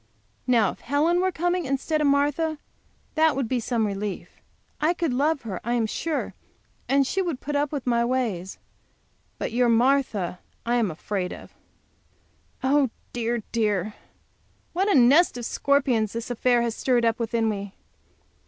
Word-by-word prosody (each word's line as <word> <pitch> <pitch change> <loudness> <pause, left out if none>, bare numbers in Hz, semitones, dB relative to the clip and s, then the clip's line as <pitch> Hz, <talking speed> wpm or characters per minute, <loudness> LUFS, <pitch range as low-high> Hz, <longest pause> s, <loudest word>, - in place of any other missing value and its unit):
Now, 230 -6 +4
if - - -14
Helen 315 +6 +1
were 375 0 +1
coming 350 0 -1
instead 275 +3 -1
of 295 - +3
Martha, 290 +3 +1 0.6
that 315 -2 +3
would 270 -3 -1
be 250 +1 0
some 230 -1 0
relief. 200 -1 -5 0.4
I 325 +4 +2
could 330 -6 -1
love 290 +2 +1
her, 200 -6 -5
I 240 +1 0
am 230 -2 +1
sure, 310 +8 -3 0.6
and 275 0 +4
she 385 +8 0
would 335 -8 -2
put 295 +1 -4
up 285 0 +1
with 285 -4 -4
my 235 -1 +2
ways. 230 -8 -2 0.8
But - - -3
your 240 +1 +2
Marthas 230 -7 +2 0.3
I 240 +1 +1
am 225 -5 +1
afraid 180 +3 -3
of. - - -10 1.1
Oh, 275 0 +3 0.2
dear, 235 -1 -1
dear, 210 -3 0 0.8
what 385 +4 +1
a 400 - +4
nest 270 +4 +5
of 240 - -5
scorpions 255 -6 +1
this 230 +1 -4
affair 245 0 +2
has 235 -1 -1
stirred 245 -3 +1
up 230 0 +1
within 230 -1 0
me! 200 -2 -4
245 Hz, 160 wpm, -25 LUFS, 225-290 Hz, 1.1 s, nest